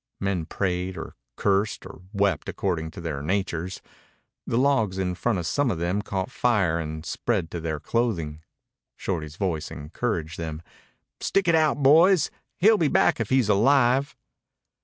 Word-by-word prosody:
Men 95 Hz, -5 st, -1 dB
prayed 90 Hz, -1 st, -2 dB
or -, -, -7 dB, 0.2 s
cursed 100 Hz, +1 st, 0 dB
or -, -, -11 dB
wept, 100 Hz, -2 st, 0 dB
according 85 Hz, -5 st, -2 dB
to 80 Hz, -, -10 dB
their 75 Hz, -5 st, -4 dB
natures. 90 Hz, +1 st, -2 dB, 0.6 s
The 115 Hz, -, 0 dB
logs 120 Hz, -8 st, +2 dB
in 90 Hz, -1 st, -1 dB
front 110 Hz, +4 st, 0 dB
of 85 Hz, -, -3 dB
some 145 Hz, -, +1 dB
of 95 Hz, -, -1 dB
them 90 Hz, +5 st, -1 dB
caught 95 Hz, -2 st, -3 dB
fire 100 Hz, -9 st, +2 dB
and 80 Hz, 0 st, -5 dB
spread 95 Hz, -9 st, -1 dB
to 85 Hz, -, -4 dB
their 80 Hz, -2 st, -3 dB
clothing. 85 Hz, -9 st, -1 dB, 0.5 s
Shorty's 80 Hz, -5 st, -4 dB
voice 85 Hz, -6 st, -2 dB
encouraged 80 Hz, -, -4 dB
them. 80 Hz, -1 st, -5 dB, 0.6 s
"Stick 195 Hz, -2 st, +1 dB
it 170 Hz, -, +4 dB
out, 155 Hz, -3 st, +2 dB
boys. 165 Hz, +4 st, +6 dB, 0.3 s
He'll 215 Hz, +4 st, +5 dB
be 160 Hz, -, +3 dB
back -, -, +3 dB
if 115 Hz, -, -2 dB
he's 130 Hz, -4 st, +3 dB
alive." 130 Hz, +5 st, +3 dB
95 Hz, 160 wpm, -25 LUFS, 85-120 Hz, 0.6 s, boys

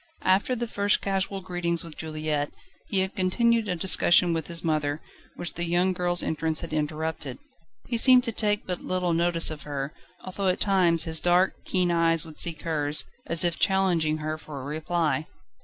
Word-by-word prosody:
After 195 Hz, +7 st, +2 dB
the 240 Hz, 0 st, -3 dB
first 205 Hz, -2 st, 0 dB
casual 195 Hz, 0 st, -2 dB
greetings 175 Hz, -2 st, -2 dB
with 165 Hz, -2 st, -10 dB
Juliette, 155 Hz, -2 st, -3 dB, 0.4 s
he 195 Hz, -, +1 dB
had 190 Hz, +1 st, -3 dB
continued 225 Hz, +4 st, +1 dB
a 180 Hz, -, -1 dB
discussion 175 Hz, 0 st, +4 dB
with 160 Hz, -2 st, -3 dB
his 170 Hz, -1 st, +1 dB
mother, 155 Hz, -2 st, -1 dB, 0.4 s
which 175 Hz, -, -4 dB
the 175 Hz, -, -3 dB
young 175 Hz, +2 st, +1 dB
girl's 175 Hz, 0 st, +1 dB
entrance 160 Hz, 0 st, -2 dB
had 170 Hz, -, -7 dB
interrupted. 155 Hz, -3 st, -3 dB, 0.5 s
He 235 Hz, -, -2 dB
seemed 250 Hz, +1 st, +7 dB
to 235 Hz, -, -1 dB
take 210 Hz, -1 st, 0 dB
but 180 Hz, -1 st, -4 dB
little 180 Hz, -2 st, -1 dB
notice 170 Hz, -1 st, +2 dB
of 155 Hz, -1 st, -7 dB
her, 140 Hz, -1 st, -5 dB, 0.3 s
although 190 Hz, +1 st, -3 dB
at 185 Hz, -, +1 dB
times 180 Hz, -5 st, +3 dB
his 160 Hz, -1 st, 0 dB
dark, 180 Hz, +2 st, +2 dB
keen 180 Hz, -2 st, +1 dB
eyes 165 Hz, -1 st, +2 dB
would 160 Hz, -2 st, -9 dB
seek 165 Hz, -3 st, 0 dB
hers, 150 Hz, -2 st, +1 dB, 0.2 s
as 170 Hz, +1 st, +5 dB
if 170 Hz, -1 st, -1 dB
challenging 175 Hz, -5 st, +1 dB
her 155 Hz, 0 st, -4 dB
for 150 Hz, -3 st, -9 dB
a -, -, -9 dB
reply. 155 Hz, +1 st, -2 dB
170 Hz, 185 wpm, -26 LUFS, 155-185 Hz, 0.5 s, seemed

